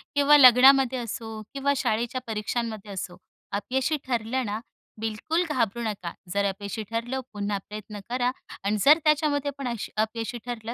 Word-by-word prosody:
किंवा 285 +1 +6
लग्नामध्ये 260 0 +7
असो 225 -1 -6
किंवा 280 +1 +1
शाळेच्या 240 +2 -1
परीक्षांमध्ये 220 -1 -3
असो, 185 -2 -6 0.3
अपयशी 260 +9 0
ठरलं 245 +1 -1
ना, 210 +1 -3 0.4
बिलकुल 225 +10 -1
घाबरू 235 -5 0
नका. 200 -6 -3 0.2
जर 200 0 +1
अपयशी 200 +2 -3
ठरलं, 235 +3 -2
पुन्हा 205 0 -2
प्रयत्न 210 0 -7
करा 250 0 +1 0.3
आणि 205 +2 +1
जर 300 +2 +8
त्याच्यामध्ये 295 -2 +2
पण 275 -2 -4
अशी 235 -3 -4
अपयशी 220 +1 -1
ठरलं, 235 -1 -5
235 Hz, 145 wpm, -26 LUFS, 215-265 Hz, 0.4 s, जर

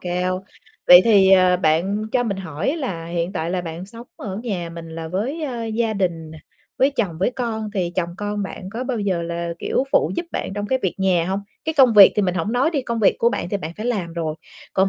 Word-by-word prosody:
cao. 180 +1 -2 0.4
Vậy 180 0 +10
thì, 200 -4 +5
ờ, 185 -1 +5
bạn 180 +5 +1
cho 250 - +2
mình 200 -4 -2
hỏi 190 - -3
là 180 - -4
hiện 170 +2 -2
tại 165 -2 -3
là 180 0 -1
bạn 170 +1 -6
sống 230 +4 -11
ở 195 -3 -6
nhà 180 -8 -3
mình 165 -1 -9
là 160 0 -6
với, 240 - -3
a, 240 -5 -3
gia 225 0 -1
đình 170 -5 -2
nè, 160 - -11 0.4
với 270 +2 +4
chồng, 205 - -2
với 195 - +1
con 225 -4 -3
thì 175 -3 -1
chồng 170 -2 0
con 205 0 -3
bạn 190 0 -7
có 240 +4 -4
bao 250 -3 -2
giờ 190 -4 -1
là, 170 0 -3
kiểu, 265 - 0
phụ - - +3
giúp 345 0 -2
bạn - - -3
trong 205 0 -3
cái 260 +4 +1
việc 190 - 0
nhà 185 -3 +2
hông? 195 +1 -1 0.2
Cái 320 - -1
công 255 -4 +7
việc 205 -2 +9
thì 210 - +3
mình 180 -2 0
hổng 185 +6 -2
nói 265 +6 +2
đi, 285 -5 -1
công 235 -2 -3
việc 205 - +4
của 235 - +4
bạn 180 -7 -3
thì 200 - -1
bạn 160 -3 -6
phải 215 - -5
làm 190 -9 -2
rồi, 160 -2 -3 0.4
còn 190 0 +3
195 Hz, 250 wpm, -21 LUFS, 170-230 Hz, 0.4 s, Vậy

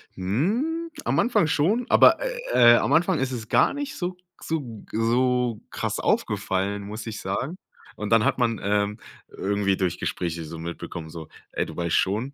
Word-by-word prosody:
Hm, 220 - -1 0.2
am - - +1
Anfang 235 -9 +3
schon, 190 +12 +1
aber, - - +6
äh, - - +4
äh, - - +7
am - - 0
Anfang 175 0 +3
ist 135 0 -1
es 115 -4 -5
gar - - +3
nicht 285 0 -5
so 180 0 -3 0.3
so 130 -9 -4
so 120 0 +1
krass - - -3
aufgefallen, 100 +2 0
muss 105 +2 -7
ich 110 -1 -5
sagen, 125 - -3 0.4
und 105 - -5
dann 115 +1 +4
hat 140 - +2
man, 115 -4 +1
ähm, 105 +1 0 0.3
irgendwie 100 -1 0
durch 90 -3 -1
Gespräche 85 -1 -3
so 80 +2 -8
mitbekommen, 85 0 -7
so: 80 -1 -9 0.2
„Ey, - - -1
du - - -10
weißt 85 -1 0
schon, 110 +9 0
115 Hz, 175 wpm, -25 LUFS, 100-155 Hz, 0.4 s, äh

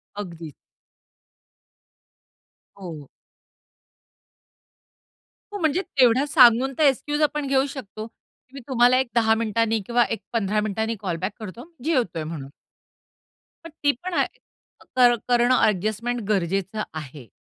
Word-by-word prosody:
अगदीच. 170 -6 -7 2.2
हो. 165 -7 -9 2.5
हो, - - -3
म्हणजे 320 +1 +1
तेवढं 265 -7 +3
सांगून 255 -2 +5
तर 315 - +2
एक्सक्यूज 295 +2 +1
आपण 300 -1 0
घेऊ 270 0 +2
शकतो 215 -4 -7
की 255 +2 -33
मी 275 - -8
तुम्हाला 250 -1 +4
एक 260 - 0
10 220 -1 +4
मिनिटांनी 225 0 0
किंवा 240 +2 +3
एक 225 - -3
15 215 -2 0
मिनिटांनी 220 +2 -2
कॉल 185 -4 -3
बॅक 185 +3 -1
करतो, 230 - -9
जेवतोय 245 - 0
म्हणून. 155 -4 -7 1.2
पण 330 - -8
ती 285 - +5
पण 370 0 -4
ॲ - - +2 0.7
कर 245 -1 +6
करणं 245 +1 +3
ॲडजस्टमेंट 215 +4 0
गरजेचं 195 +2 -1
आहे. 145 -5 -9
230 Hz, 120 wpm, -23 LUFS, 195-265 Hz, 2.5 s, कर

